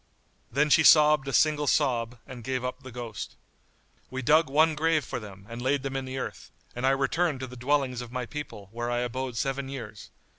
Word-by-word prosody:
Then 145 +5 +2
she 160 - +7
sobbed 150 -2 +6
a - - -1
single 150 +1 +3
sob 120 -5 +1
and 125 -3 -9
gave 130 +1 -2
up 125 +1 -4
the 130 -1 -10
ghost. 120 -3 -6 0.7
We 130 0 -4
dug 155 +3 +4
one 155 +3 +4
grave 155 -2 +1
for - - -4
them 100 -3 -11
and 115 +2 -7
laid 135 +2 +1
them 135 -1 -4
in 135 -1 -2
the 130 0 -5
earth, - - -6 0.3
and 125 +2 0
I - - +6
returned 135 +3 +1
to - - -2
the 125 0 -10
dwellings 130 -1 0
of 120 -1 -9
my 125 -1 -3
people, 115 -8 -7
where 120 +1 -3
I 120 0 0
abode 125 0 -3
seven 135 +1 -2
years. 110 -7 -8
130 Hz, 215 wpm, -27 LUFS, 120-145 Hz, 0.7 s, she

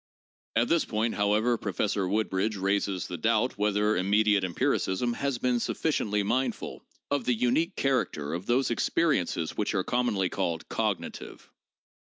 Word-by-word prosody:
At 115 +2 +3
this 170 -1 +3
point, 110 +1 -1
however, 110 +4 +2
Professor 100 0 -1
Woodbridge 105 +1 0
raises 100 -2 0
the 90 -2 -6
doubt 115 +4 +1
whether 105 +1 +2
immediate 100 +1 +3
empiricism 95 +5 0
has 140 +1 -1
been 125 0 +1
sufficiently 105 -7 0
mindful 130 +6 -2 0.3
of 140 -3 0
the 125 - +2
unique 145 - +1
character 105 - 0
of 90 +3 -5
those 125 +1 +2
experiences 120 - 0
which 105 - -1
are 95 - +1
commonly 115 -5 +1
called 85 -2 -2
cognitive. - - -4
105 Hz, 140 wpm, -28 LUFS, 95-120 Hz, 0.3 s, At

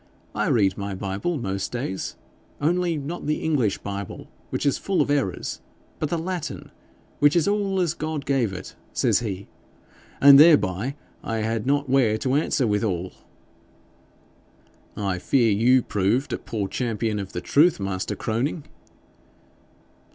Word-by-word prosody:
"I 105 0 -1
read 100 -8 +2
my 100 -1 -4
Bible 100 - -2
most 95 -6 -3
days, 120 -6 -4 0.4
only 170 +2 +1
not 150 +3 -5
the 150 - -1
English 130 -11 +1
Bible, 100 -1 -7 0.2
which - - -3
is 140 - +2
full 195 -2 -1
of - - +2
errors, 135 -11 -1 0.4
but 155 - -1
the 170 - 0
Latin, 170 -1 -5 0.5
which 145 +2 +4
is 170 0 +3
all 200 -2 +1
as 170 -4 +1
God 155 -3 -4
gave 130 -6 +1
it," 90 -7 -8 0.2
says - - +2
he. 100 -4 -5 0.7
And 140 0 +9
thereby 140 - +4 0.3
I 115 - -2
had 115 +1 -2
not 145 0 +1
where 125 -5 +3
to 130 +4 -1
answer 140 -2 +1
withal.' 105 -4 -1 1.8
'I 95 -3 -1
fear 120 +2 +2
you 120 +5 +4
proved 105 +8 0
a - - -2
poor 105 -4 -3
champion 110 -2 -2
of 100 -1 -6
the - - -2
truth, 150 - +3
master 95 -1 -3
Croning.' 130 +8 -2
125 Hz, 145 wpm, -24 LUFS, 100-150 Hz, 1.8 s, And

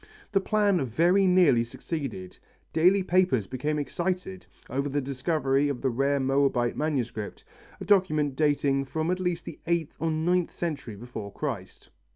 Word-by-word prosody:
The 195 -2 +2
plan 205 -5 +2
very 175 - +3
nearly 175 -10 +5
succeeded. 120 - -6 0.4
Daily 185 +4 +4
papers 180 - +2
became 140 +7 -2
excited 150 - -3 0.2
over 140 +3 -2
the 145 +1 0
discovery 140 +1 0
of 135 -3 -3
the 130 - +1
rare 140 +3 +1
Moabite 135 -3 +1
manuscript, 120 -9 -3 0.4
a - - -6
document 155 -8 +2
dating 140 -2 +1
from 160 +5 -2
at 185 - -1
least 180 -2 -2
the - - -8
eighth 170 -3 -1
or 165 +2 0
ninth 170 +3 +1
century 145 -10 -4
before 105 -2 -7
Christ. 105 -9 -6
145 Hz, 150 wpm, -27 LUFS, 130-170 Hz, 0.4 s, nearly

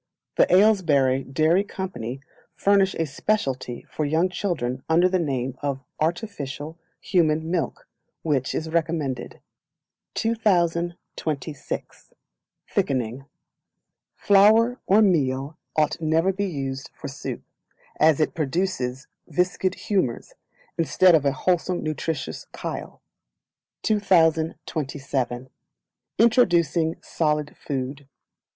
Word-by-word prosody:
The - - +4
Aylesbury 160 -10 +4
Dairy 155 +8 +2
Company 135 - -5 0.3
furnish 195 -1 +3
a 165 - 0
speciality 135 - -2
for 155 - -3
young 160 +5 +2
children 150 -10 -2
under 170 +3 +5
the 185 0 +1
name 135 -5 -2
of 140 -2 -2 0.2
"Artificial 160 - -3 0.2
Human 160 -3 +1
Milk," 165 -8 -2 0.4
which 140 -5 0
is 160 - -2
recommended. 160 -6 -2 0.7
2026. 170 - -2 0.6
Thickening. 130 0 -1 0.9
Flour 220 +5 +5
or 210 +3 +6
Meal 140 -5 +1 0.2
ought 155 +1 +1
never 165 +4 +2
to - - -12
be 200 - 0
used 135 -5 -4
for - - -7
soup, - - -6 0.6
as 155 -1 +5
it 155 - +1
produces 140 -4 -2 0.2
viscid 180 +1 0
humours, 185 - -1 0.5
instead 175 +2 +5
of 155 -3 +4
a 140 - +4
wholesome 175 +5 0
nutritious 155 - -3
chyle. - - -6 0.8
2027 155 - 0 0.7
Introducing 170 - +3
Solid 150 -2 -1
Food. 135 0 -5
160 Hz, 100 wpm, -24 LUFS, 135-185 Hz, 0.9 s, or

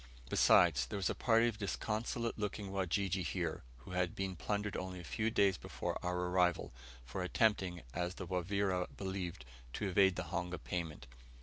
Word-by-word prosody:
Besides, 70 -8 +5
there 100 - -3
was 95 - +1
a - - -1
party 115 0 +4
of 110 -3 -3
disconsolate 110 +3 -2
looking 105 -1 -3
Wajiji 95 0 0
here, 75 - -2 0.2
who 60 +9 -12
had 90 -1 0
been 95 -1 -2
plundered 105 +3 -2
only 90 0 -4
a - - -8
few 110 +5 0
days 100 -4 +3
before - - -4
our 90 0 0
arrival, 90 -5 +2 0.3
for 65 +9 -4
attempting, 90 -2 +1
as 90 +1 -2
the 95 - -5
Wavira 90 +1 0
believed, 95 -9 -4 0.3
to 105 - -1
evade 95 0 +4
the - - -2
honga 90 0 -1
payment. 80 -6 -4
95 Hz, 170 wpm, -36 LUFS, 90-100 Hz, 0.3 s, Besides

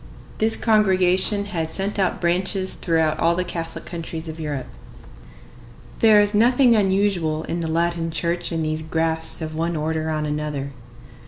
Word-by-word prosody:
This 220 +1 +2
congregation 200 -2 +3
had 165 -6 -3
sent 200 +4 -2
out 190 - 0
branches 185 +2 +1
throughout 160 -2 0
all 170 +1 +2
the 180 - 0
Catholic 165 -2 -6
countries 165 -1 -6
of 160 +1 -7
Europe. 145 -4 -4 1.3
There 220 -2 +6
is 205 +1 +3
nothing 240 +3 +4
unusual 190 -6 +1
in 170 - -3
the 165 - -2
Latin 165 0 0
Church 170 +2 -2
in 165 -1 -1
these 155 0 -2
grafts 160 +1 -1
of 155 0 -5
one 165 +2 -2
order 160 +1 -2
on 155 -1 -1
another. 150 -2 -3
170 Hz, 155 wpm, -22 LUFS, 160-195 Hz, 1.3 s, There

